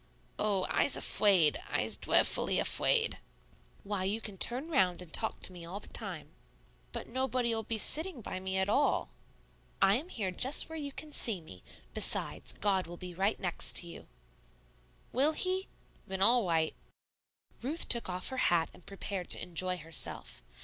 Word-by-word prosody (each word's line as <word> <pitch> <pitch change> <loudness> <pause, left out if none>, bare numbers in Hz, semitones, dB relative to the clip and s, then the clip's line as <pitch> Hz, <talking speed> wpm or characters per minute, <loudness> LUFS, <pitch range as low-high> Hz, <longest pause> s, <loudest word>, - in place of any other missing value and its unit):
"Oh, 200 -3 +1
I's 285 - +2
afwaid. 185 -8 +3
I's - - -1
dweffully - - +2
afwaid." 465 -2 +2 0.6
"Why, 200 -2 -3
you 200 +4 -1
can 210 -3 -7
turn 250 - +2
round 190 - +2
and 180 -3 -8
talk 220 - -1
to - - -1
me 175 -1 -10
all 180 +4 -6
the - - -7
time." - - -5 0.6
"But - - -6
nobody'll 245 -2 -1
be 225 +1 -2
sitting 315 - +2
by 185 - -5
me 190 0 -3
at 190 0 +1
all." 275 +8 +1 0.7
"I 195 +2 +4
am 315 +8 -7
here 200 - -2
just 260 - +4
where 320 0 -6
you 285 -1 -5
can 300 +2 -7
see 225 -9 +3
me; 95 - -13 0.3
besides, - - +2
God 195 -3 0
will 175 0 -9
be 180 0 -8
right 195 +5 0
next 175 -2 -1
to 175 - +4
you." 170 - -11 1.0
"Will 280 +5 +2
He? 370 +3 -1 0.4
Ven 190 0 -5
all 230 +3 +4
yight." 160 -2 +1 0.9
Ruth 295 +8 0
took 235 -5 +1
off 180 0 -2
her 260 - -5
hat 165 -2 +1
and - - -17
prepared 195 -2 -5
to - - +2
enjoy 180 +1 +1
herself. 165 - -3
200 Hz, 170 wpm, -32 LUFS, 180-255 Hz, 1.0 s, I